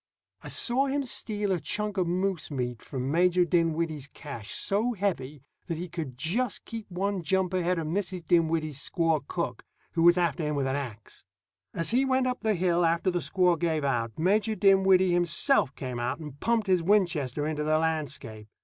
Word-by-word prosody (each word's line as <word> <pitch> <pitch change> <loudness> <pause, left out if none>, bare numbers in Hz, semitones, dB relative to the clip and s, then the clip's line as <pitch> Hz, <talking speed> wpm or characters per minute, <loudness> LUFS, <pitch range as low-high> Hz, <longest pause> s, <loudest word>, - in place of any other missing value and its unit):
I - - -10
saw 260 +3 +1
him 280 +1 0
steal 210 -5 -1
a 180 - +1
chunk 210 +4 -2
of 180 -2 +1
moose 185 0 -1
meat 125 -5 -3
from 130 0 -4
Major 180 +2 +3
Dinwiddie's 165 -4 0
cache 140 -8 -9
so 220 +5 0
heavy 155 - -3 0.2
that 165 - -3
he 175 +2 -5
could 155 -7 -6
just 200 - -1
keep 225 -2 -7
one 195 +1 -2
jump 185 +2 0
ahead 180 -1 +1
of 165 - -2
Mrs. 180 +1 -3
Dinwiddie's 160 -4 +1
squaw 165 -1 +1
cook, 145 -9 -3 0.3
who 165 - -1
was 175 +1 +6
after 170 -3 +1
him 150 -1 -1
with 140 -1 0
an 135 0 -1
ax. 120 -7 -7 0.5
As 165 - 0
he 250 +3 +3
went 260 -1 +2
up 250 0 -1
the 215 -1 +1
hill, 175 -1 +2
after 170 +3 +2
the 175 - 0
squaw 180 -2 +2
gave 160 -3 0
out, 115 -5 -1
Major 205 +6 +2
Dinwiddie 190 -2 +4
himself 175 - +2
came 125 -3 -5
out 120 +4 -1
and 150 -3 -9
pumped 230 -2 +1
his 185 -3 +2
Winchester 165 -8 +1
into 150 -1 -2
the 155 +1 +2
landscape. 150 -9 -3
170 Hz, 185 wpm, -28 LUFS, 150-195 Hz, 0.5 s, was